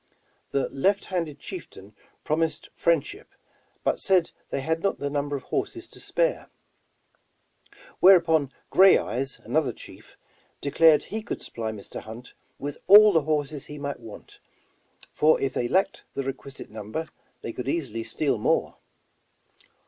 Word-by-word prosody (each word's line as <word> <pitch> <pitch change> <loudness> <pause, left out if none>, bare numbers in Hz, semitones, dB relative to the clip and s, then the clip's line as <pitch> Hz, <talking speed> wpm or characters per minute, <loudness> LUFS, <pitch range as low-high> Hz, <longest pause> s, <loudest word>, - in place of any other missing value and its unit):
The 140 -1 0
left 195 +9 +1
handed 165 -6 -3
chieftain 365 - -10 0.3
promised 155 0 -1
friendship, 165 -4 -1 0.5
but - - +1
said 185 -3 +2 0.2
they - - -2
had 160 +4 -1
not 195 - 0
the 145 0 -3
number 145 0 -1
of 135 - -5
horses 345 -1 -3
to - - -14
spare. - - -1 1.5
Whereupon, 165 -6 +5 0.2
Gray 190 0 +7
Eyes, 135 +2 -3
another 150 -5 0
chief, - - -14 0.4
declared 155 +2 +4
he 220 +1 -5
could 220 - -6
supply 110 -1 -5
Mr. 105 -2 -8
Hunt 115 +3 -11 0.2
with 145 0 -6
all 210 +1 +9
the 160 - +4
horses 150 -1 -2
he 150 - -8
might 140 -1 -4
want, 115 -3 -12 0.7
for 155 +1 +4
if 135 -1 -1
they 120 - -1
lacked 190 +8 +1
the 140 - -2
requisite 135 -1 -7
number, 110 +9 -5 0.4
they 115 - -5
could 125 - -6
easily 125 -9 -2
steal 120 +2 -1
more. - - 0
145 Hz, 140 wpm, -26 LUFS, 135-170 Hz, 1.5 s, all